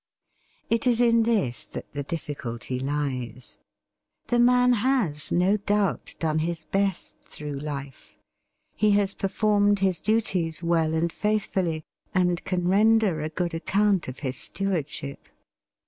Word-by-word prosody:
It 230 Hz, +2 st, +1 dB
is 240 Hz, -2 st, +3 dB
in 230 Hz, -1 st, +5 dB
this 215 Hz, -, 0 dB
that -, -, -8 dB
the 145 Hz, -, -4 dB
difficulty 130 Hz, -5 st, -5 dB
lies. 130 Hz, -4 st, -4 dB, 0.7 s
The 240 Hz, -, +2 dB
man 250 Hz, +1 st, +5 dB
has 210 Hz, -, 0 dB
no 185 Hz, +4 st, +3 dB
doubt 205 Hz, -1 st, -1 dB
done 155 Hz, -1 st, 0 dB
his 165 Hz, 0 st, -2 dB
best 195 Hz, 0 st, -2 dB
through 145 Hz, -2 st, -7 dB
life; 140 Hz, -2 st, -7 dB, 0.6 s
he 210 Hz, 0 st, +3 dB
has 200 Hz, -1 st, +1 dB
performed 205 Hz, +1 st, +2 dB
his 190 Hz, -3 st, +1 dB
duties 185 Hz, -7 st, 0 dB
well 165 Hz, -2 st, +2 dB
and 165 Hz, +1 st, 0 dB
faithfully, 195 Hz, -6 st, -1 dB, 0.3 s
and 180 Hz, -1 st, +2 dB
can 180 Hz, -1 st, -1 dB
render 210 Hz, -3 st, +3 dB
a 155 Hz, -, -2 dB
good 170 Hz, +2 st, -2 dB
account 195 Hz, +3 st, +1 dB
of 130 Hz, 0 st, -7 dB
his 130 Hz, -3 st, -3 dB
stewardship. 155 Hz, -7 st, -3 dB
180 Hz, 130 wpm, -26 LUFS, 150-210 Hz, 0.7 s, in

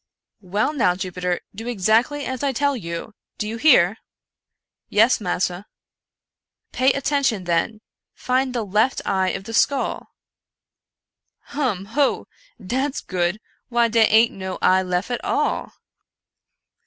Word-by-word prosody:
" -, -, -56 dB
Well 215 Hz, +8 st, +2 dB
now, 185 Hz, -11 st, +2 dB
Jupiter, 180 Hz, -1 st, -3 dB
do 225 Hz, +4 st, -8 dB
exactly 240 Hz, +6 st, +1 dB
as 260 Hz, -1 st, -4 dB
I 280 Hz, -2 st, 0 dB
tell 285 Hz, +2 st, +1 dB
you 170 Hz, 0 st, -6 dB
— -, -, -62 dB
do 210 Hz, -, -3 dB
you 225 Hz, +2 st, -4 dB
hear?" 225 Hz, -, +5 dB, 0.5 s
" -, -, -64 dB
Yes, 225 Hz, +3 st, +4 dB
massa." 180 Hz, 0 st, -2 dB, 0.5 s
" -, -, -63 dB
Pay 260 Hz, +1 st, +3 dB
attention, 275 Hz, -7 st, 0 dB
then 180 Hz, +5 st, -1 dB, 0.2 s
— -, -, -67 dB
find 255 Hz, 0 st, +1 dB
the 230 Hz, -3 st, -1 dB
left 215 Hz, +6 st, +1 dB
eye 190 Hz, -1 st, +1 dB
of 195 Hz, -, -4 dB
the 225 Hz, -, -8 dB
skull." 270 Hz, +4 st, 0 dB, 0.6 s
" -, -, -61 dB
Hum! 245 Hz, -10 st, -1 dB
hoo! 285 Hz, 0 st, +1 dB, 0.3 s
dat's 265 Hz, +8 st, -2 dB
good! 180 Hz, +2 st, -2 dB, 0.3 s
why 235 Hz, -1 st, +2 dB
dey 225 Hz, 0 st, +4 dB
ain't 225 Hz, +2 st, +4 dB
no 190 Hz, -1 st, -5 dB
eye 185 Hz, +1 st, +4 dB
lef 180 Hz, +4 st, -2 dB
at 245 Hz, -, -3 dB
all." -, -, -1 dB
220 Hz, 150 wpm, -22 LUFS, 185-255 Hz, 0.6 s, hear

